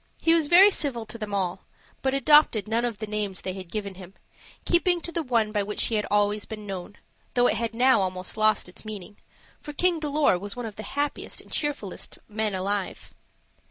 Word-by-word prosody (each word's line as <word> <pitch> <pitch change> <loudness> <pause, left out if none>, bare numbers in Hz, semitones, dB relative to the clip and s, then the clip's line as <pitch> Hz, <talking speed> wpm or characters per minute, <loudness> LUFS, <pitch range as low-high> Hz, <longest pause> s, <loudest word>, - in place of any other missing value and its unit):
He 330 - +4
was 325 -3 +3
very 375 +6 +8
civil 260 - 0
to 220 +2 -7
them 215 -1 -5
all, 190 -3 -2 0.3
but 265 0 0
adopted 275 -7 +5
none 230 +2 +1
of 235 -3 -3
the 215 - -4
names 210 -3 -3
they 185 - -4
had 185 -2 -9
given 205 -2 -4
him, 185 0 -12 0.5
keeping 350 0 +3
to 340 - -4
the 335 - -1
one 230 -6 +1
by 210 -1 0
which 205 +1 +1
he 225 - 0
had 210 - -1
been 205 - +3
always 205 0 0
known, 205 -2 -7 0.4
though 245 0 +4
it - - +2
had 230 -1 -3
now 255 -2 +4
almost 185 -1 -2
lost 215 -2 +2
its 180 - -12
meaning; 210 -2 -8 0.4
for 295 - -8
King 350 +2 +2
Dolor 295 - +2
was 200 +1 -5
one 245 -1 -5
of 215 -2 -7
the - - -7 0.2
happiest 290 0 -2
and - - -15
cheerfulest 290 -10 -3
men 215 -1 -2
alive. 195 +1 -3
215 Hz, 210 wpm, -26 LUFS, 200-275 Hz, 0.5 s, very